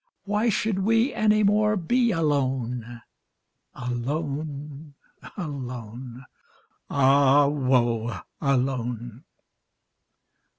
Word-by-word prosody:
Why 210 +3 +1
should 210 -1 0
we 225 +6 +2
any 215 0 +3
more 210 +1 +3
be 235 +7 +2
alone? 130 - -1 0.7
Alone, 145 +3 -4 0.4
alone, 125 - -7 0.6
ah 140 +1 +5
woe! 125 -5 +1 0.2
alone! 125 -3 -1
140 Hz, 70 wpm, -25 LUFS, 125-180 Hz, 0.7 s, ah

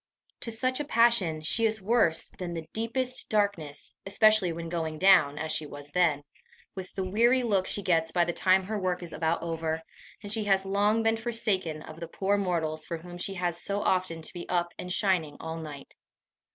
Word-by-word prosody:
To - - -6
such 255 +4 -1
a - - -1
passion, 230 - +3
she 225 +8 +1
is 220 0 -1
worse 195 -5 +2
than 175 -2 -4
the 160 -1 -6
deepest 250 +3 -2
darkness, 200 -9 -1
especially 215 -2 +4
when 165 0 -5
going 160 -2 -3
down, 180 -6 +5
as 160 0 -3
she 155 -1 -1
was 145 0 -10
then, 155 -3 +2 0.5
with 190 -1 -7
the 190 - -1
weary 240 +6 +3
look 200 -5 +1
she 205 - -2
gets 165 -3 +2
by 175 0 +2
the 175 - -2
time 190 0 +3
her 210 +2 -3
work 180 -1 -1
is 170 - -8
about 160 +2 -1
over, 160 -1 -2 0.4
and 205 - -5
she 215 -1 -1
has 195 -1 +2
long 205 +3 +2
been 225 0 +2
forsaken 210 -9 -1
of 155 +1 -11
the 170 - -6
poor 195 +4 0
mortals 165 -5 -1
for 170 - -3
whom 175 +2 -10
she 195 +2 -3
has 175 -1 -1
so 200 0 -2
often 180 -3 0
to - - -4
be 175 - -8
up 175 -1 0
and 180 - -5
shining 180 -7 0
all 160 0 -5
night. 150 -4 -9
180 Hz, 205 wpm, -28 LUFS, 165-205 Hz, 0.5 s, down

